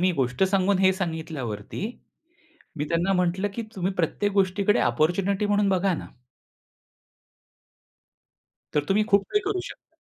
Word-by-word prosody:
मी 185 Hz, +1 st, +3 dB
गोष्ट 130 Hz, +1 st, -1 dB
सांगून 190 Hz, 0 st, +2 dB
हे 190 Hz, 0 st, +5 dB
सांगितल्यावरती 160 Hz, -, -4 dB, 0.9 s
मी 150 Hz, -, -1 dB
त्यांना 170 Hz, +3 st, +1 dB
म्हटलं, 180 Hz, +2 st, +1 dB
की 235 Hz, -, -3 dB
"तुम्ही 190 Hz, 0 st, -1 dB
प्रत्येक 200 Hz, +4 st, 0 dB
गोष्टीकडे 195 Hz, +1 st, +2 dB
ऑपॉर्च्युनिटी 180 Hz, -, +1 dB
म्हणून 205 Hz, -1 st, +2 dB
बघा 190 Hz, 0 st, +2 dB
ना." -, -, -5 dB, 2.7 s
तर 150 Hz, -1 st, +1 dB
तुम्ही 210 Hz, +2 st, +3 dB
खूप 200 Hz, 0 st, +4 dB
काही 415 Hz, +1 st, +2 dB
करू 390 Hz, -2 st, -1 dB
शकता. -, -, -14 dB
190 Hz, 130 wpm, -25 LUFS, 165-200 Hz, 2.7 s, हे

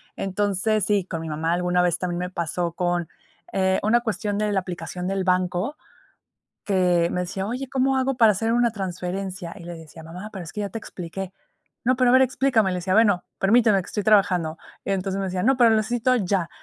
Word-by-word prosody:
Entonces, 205 Hz, +2 st, 0 dB
sí, 205 Hz, -3 st, +2 dB
con 165 Hz, -3 st, -5 dB
mi 165 Hz, -, -5 dB
mamá 160 Hz, +2 st, -1 dB
alguna 180 Hz, 0 st, +1 dB
vez 175 Hz, -1 st, +1 dB
también 175 Hz, -1 st, -2 dB
me 180 Hz, +1 st, -3 dB
pasó 170 Hz, 0 st, -2 dB
con, 175 Hz, -1 st, -1 dB, 0.5 s
eh, 190 Hz, 0 st, +2 dB
una 230 Hz, +3 st, +3 dB
cuestión 210 Hz, -2 st, -2 dB
de 210 Hz, 0 st, 0 dB
la 200 Hz, -, +2 dB
aplicación 180 Hz, 0 st, -6 dB
del 195 Hz, 0 st, -1 dB
banco, 185 Hz, +7 st, 0 dB, 0.9 s
que 180 Hz, -3 st, +2 dB
me 180 Hz, -, -1 dB
decía: 190 Hz, +2 st, -3 dB
"Oye, 250 Hz, +5 st, -4 dB
¿cómo 265 Hz, 0 st, +2 dB
hago 260 Hz, 0 st, 0 dB
para 225 Hz, -3 st, +6 dB
hacer 225 Hz, +3 st, -1 dB
una 240 Hz, 0 st, +3 dB
transferencia?" 185 Hz, -2 st, -4 dB
Y 180 Hz, -, -11 dB
le 175 Hz, 0 st, -7 dB
decía: 160 Hz, 0 st, -12 dB
"Mamá, 180 Hz, +6 st, -8 dB
pero 190 Hz, -3 st, -6 dB
es 160 Hz, -, -9 dB
que 210 Hz, -, -4 dB
ya 200 Hz, -, -3 dB
te 225 Hz, -, -5 dB
expliqué. 185 Hz, -1 st, -7 dB, 0.5 s
'No, 255 Hz, +2 st, +4 dB
pero, 250 Hz, -1 st, +3 dB
a -, -, +4 dB
ver, 260 Hz, -, +7 dB
explícame'," 255 Hz, -6 st, +2 dB
le -, -, -2 dB
decía: 185 Hz, +1 st, -1 dB
"Bueno, 205 Hz, -4 st, +4 dB, 0.2 s
permíteme, 215 Hz, -1 st, +4 dB
que -, -, -12 dB
estoy 210 Hz, -, -3 dB
trabajando", 185 Hz, -6 st, +3 dB, 0.3 s
entonces, 195 Hz, 0 st, -1 dB
me 195 Hz, -, -1 dB
decía: 185 Hz, -1 st, -2 dB
"No, 265 Hz, +3 st, +4 dB
pero 240 Hz, -2 st, +6 dB
lo 220 Hz, -, +4 dB
necesito 240 Hz, +3 st, +1 dB
ya." 185 Hz, -5 st, 0 dB
195 Hz, 215 wpm, -24 LUFS, 180-220 Hz, 0.9 s, ver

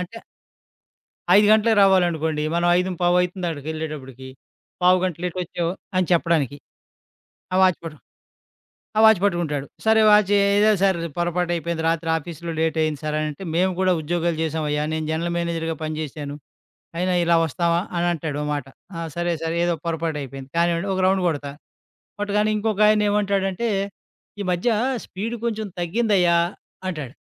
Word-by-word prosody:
అంటే 220 Hz, +6 st, -7 dB, 1.2 s
5 210 Hz, 0 st, +5 dB
గంటలకు 220 Hz, 0 st, +4 dB
రావాలనుకోండి. 165 Hz, -5 st, +2 dB
మనం 175 Hz, 0 st, +2 dB
5:15 180 Hz, -1 st, 0 dB
అయతుంది 180 Hz, 0 st, -3 dB
అక్కడికి 150 Hz, -2 st, -7 dB
వెళ్ళేటప్పటికి. 135 Hz, -5 st, -7 dB, 0.6 s
పావు 180 Hz, +1 st, +6 dB
గంట 180 Hz, -4 st, -1 dB
లేట్ 180 Hz, 0 st, -3 dB
వచ్చావు 170 Hz, 0 st, -3 dB, 0.2 s
అని 185 Hz, -1 st, +2 dB
చెప్పడానికి. 165 Hz, -5 st, +1 dB, 1.0 s
ఆ -, -, +2 dB
వాచ్ 185 Hz, -2 st, +3 dB
పట్టు 155 Hz, -2 st, -7 dB, 1.0 s
ఆ -, -, +5 dB
వాచ్ 220 Hz, -4 st, +6 dB
పట్టుకుంటాడు. 165 Hz, -7 st, 0 dB, 0.2 s
సరే 220 Hz, 0 st, +5 dB
వాచీ 210 Hz, -1 st, +5 dB, 0.2 s
"ఏదో 210 Hz, +1 st, +4 dB
సార్ 190 Hz, -3 st, +3 dB, 0.2 s
పొరపాటు 175 Hz, 0 st, 0 dB
అయిపోయింది. 170 Hz, -1 st, -3 dB
రాత్రి 165 Hz, 0 st, 0 dB
ఆఫీసులో 170 Hz, +1 st, -7 dB
లేట్ 160 Hz, 0 st, 0 dB
అయింది 155 Hz, -2 st, -1 dB
సార్" 150 Hz, 0 st, -2 dB
అని 155 Hz, -, -1 dB
అంటే, 170 Hz, +7 st, -10 dB
"మేము 185 Hz, +1 st, +2 dB
కూడా 185 Hz, -1 st, +3 dB
ఉద్యోగాలు 170 Hz, +1 st, -1 dB
చేసామయ్యా! 150 Hz, -1 st, -1 dB
నేను 160 Hz, -1 st, -2 dB
జనరల్ 170 Hz, +2 st, -1 dB
మేనేజర్‌గా 165 Hz, -1 st, -2 dB
పని 155 Hz, 0 st, -3 dB
చేేశాను. 145 Hz, -1 st, -6 dB, 0.6 s
అయినా 180 Hz, +1 st, 0 dB
ఇలా 170 Hz, 0 st, +3 dB
వస్తామా?" 170 Hz, +3 st, 0 dB, 0.2 s
అని 175 Hz, -, +1 dB
అంటాడు 155 Hz, -3 st, -4 dB
ఓ -, -, -3 dB
మాట. 145 Hz, -2 st, -3 dB, 0.3 s
"ఆ! -, -, -4 dB, 0.2 s
సరే, 175 Hz, 0 st, 0 dB
సరే 165 Hz, +1 st, -2 dB
ఏదో 175 Hz, -, +1 dB
పొరపటు 165 Hz, -2 st, -2 dB
అయిపోయింది. 135 Hz, 0 st, -8 dB
కానీవ్వండి" 170 Hz, +3 st, +1 dB
ఒక 190 Hz, -, 0 dB
రౌండ్ 190 Hz, -1 st, +2 dB
కొడతా. 145 Hz, -3 st, -2 dB, 0.7 s
కొట్టగానే 210 Hz, +1 st, +1 dB
ఇంకొకాయన 210 Hz, 0 st, +3 dB
ఏమంటాడంటే, 200 Hz, +1 st, 0 dB, 0.7 s
"ఈ -, -, -2 dB
మధ్య 180 Hz, +7 st, 0 dB, 0.4 s
స్పీడ్ 225 Hz, +5 st, -5 dB
కొంచెం 220 Hz, -2 st, -2 dB
తగ్గిందయా!" 180 Hz, -2 st, +2 dB, 0.5 s
అంటాడు. 150 Hz, -7 st, -6 dB
170 Hz, 150 wpm, -22 LUFS, 160-190 Hz, 1.2 s, పావు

